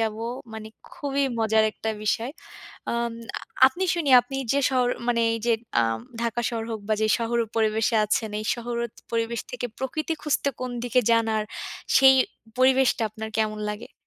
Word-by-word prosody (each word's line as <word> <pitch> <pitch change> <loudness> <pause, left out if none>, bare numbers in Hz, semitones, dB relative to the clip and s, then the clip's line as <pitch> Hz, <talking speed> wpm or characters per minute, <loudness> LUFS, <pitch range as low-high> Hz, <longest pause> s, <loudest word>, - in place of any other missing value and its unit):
যাব। 220 -1 0 0.4
মানে 220 0 -7 0.2
খুবই 280 -1 -1
মজার 220 -1 +3
একটা 220 - -3
বিষয়। 230 +5 0 0.6
আম 235 0 -1 0.5
আপনি 350 +8 -4
শুনি 310 -5 -1
আপনি 270 +2 -6 0.2
যে 280 - +3
শহর, 255 -2 +2 0.2
মানে 235 -1 +2
এই 230 - -2
যে 235 - +5 0.3
আম 115 0 0 0.2
ঢাকা 235 0 -1
শহর 230 -2 -3
হোক 220 - -3
বা 215 - +2
যে 215 - +3
শহর 235 0 -1
হোক 225 - -4
পরিবেশে 220 +1 +2
আছেন, 215 +1 0
এই 215 - -7
শহর 240 0 -5
ওত 230 - -11 0.2
পরিবেশ 230 0 -1
থেকে 250 0 -3
প্রকৃতি 305 +5 -2
খুঁজতে 290 -2 +1
কোন 255 -1 -3
দিকে 245 +1 +2
যান 230 -1 +4
আর 215 - 0 0.5
সেই 265 0 +8 0.4
পরিবেশটা 260 -2 +4
আপনার 220 +1 -7
কেমন 215 -1 0
লাগে? 210 - -9
235 Hz, 175 wpm, -25 LUFS, 220-255 Hz, 0.6 s, সেই